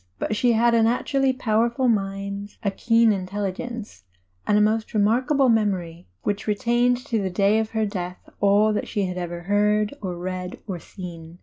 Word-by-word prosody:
But 215 - -2
she 240 +2 +3
had 235 +1 +3
a 230 - +4
natu 235 +5 0
rally 270 -1 +3
powerful 235 +1 +1
mind, 200 -1 -2
a 200 - +1
keen 230 +2 +3
intelligence, 205 - -5 0.4
and 210 - +4
a - - +5
most 215 +2 +1
re - - +3
markable 255 +6 +3
memory 190 -7 0 0.2
which 205 +1 -2
retained 240 +3 +2
to 230 -6 -1
the 190 - -1
day 200 +4 +2
of 220 -1 -1
her 220 -1 0
death 180 -3 -4 0.2
all 205 +2 +4
that 210 - -2
she 205 -3 -1
had 180 0 -4
ever 175 -1 -5
heard 210 +3 +1
or 180 -3 -4
read 185 +1 -5
or 190 -5 -5
seen. 170 -3 -10
210 Hz, 185 wpm, -24 LUFS, 190-230 Hz, 0.4 s, a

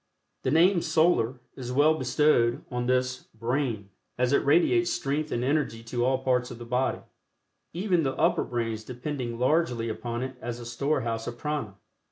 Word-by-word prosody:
The - - -1
name 170 +5 +4
"Solar" 155 -7 +2 0.2
is 125 -2 -6
well 145 +4 +4
bestowed 130 -3 +2
on 125 0 -2
this 130 0 0
"brain," 115 -3 -2 0.3
as 125 +2 +1
it - - +3
radiates 175 - +3
strength 150 +3 -2
and 120 - -1
energy 135 -4 0
to 120 +1 -2
all 130 +1 +1
parts 125 -1 +1
of 120 - -8
the 120 - -9
body, 125 +2 0 0.7
even 180 0 +1
the 135 -3 -1
upper 170 +1 +2
brains 115 -2 -3
depending 125 0 -5
largely 125 -3 +1
upon 120 +2 -4
it 130 -1 -6
as 120 0 -5
a 120 - -8
storehouse 120 -2 -1
of 120 0 -5
Prana. 150 -10 -3
125 Hz, 170 wpm, -27 LUFS, 120-150 Hz, 0.7 s, name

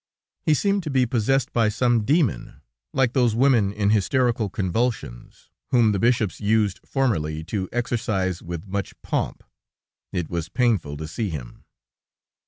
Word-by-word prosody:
He 155 -4 +3
seemed 200 +4 +1
to 160 - -5
be 130 -2 +3
possessed 125 +3 0
by 115 -3 +3
some 120 +1 +2
demon, 145 - 0 0.3
like 130 -2 +1
those 120 -4 +2
women 120 -6 +3
in 105 0 +1
hysterical 115 +1 +1
convulsions, 100 - -3 0.2
whom 120 -4 +4
the 100 - 0
bishops 115 -4 +1
used 105 -2 +1
formerly 80 - -1
to 95 +2 -3
exorcise 110 -7 -1
writh 85 0 -6
much 100 0 -4
pomp. - - -2 0.7
It 85 -3 -2
was 85 -1 -4
painful 105 - 0
to 80 +1 -5
see 105 +6 -3
him." 70 -8 -8
110 Hz, 145 wpm, -24 LUFS, 95-125 Hz, 0.7 s, whom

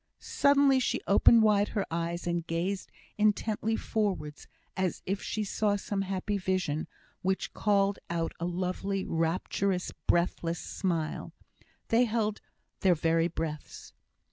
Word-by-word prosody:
Suddenly 280 -1 +3
she 255 - 0
opened 220 +3 +6
wide 210 -1 +4
her 200 - +1
eyes, 170 +1 -2
and 170 -1 -1
gazed 180 +4 -2 0.3
intently 215 +1 +1
forwards, 190 -11 -2 0.3
as 185 -2 -1
if 195 +2 -2
she 215 - -2
saw 205 0 +1
some 200 0 -2
happy 195 +1 -2
vision, 185 -5 -1 0.3
which 190 +1 -1
called 200 -1 +2
out 165 -1 -1
a 170 - -2
lovely, 185 +2 -2
rapturous, 180 +3 -1 0.2
breathless 170 -1 +1
smile. 165 -5 -3 0.6
They 235 +2 +4
held 215 -2 -1 0.4
their 185 -2 +4
very 165 +1 +2
breaths. 160 -3 -6
190 Hz, 125 wpm, -29 LUFS, 170-210 Hz, 0.6 s, opened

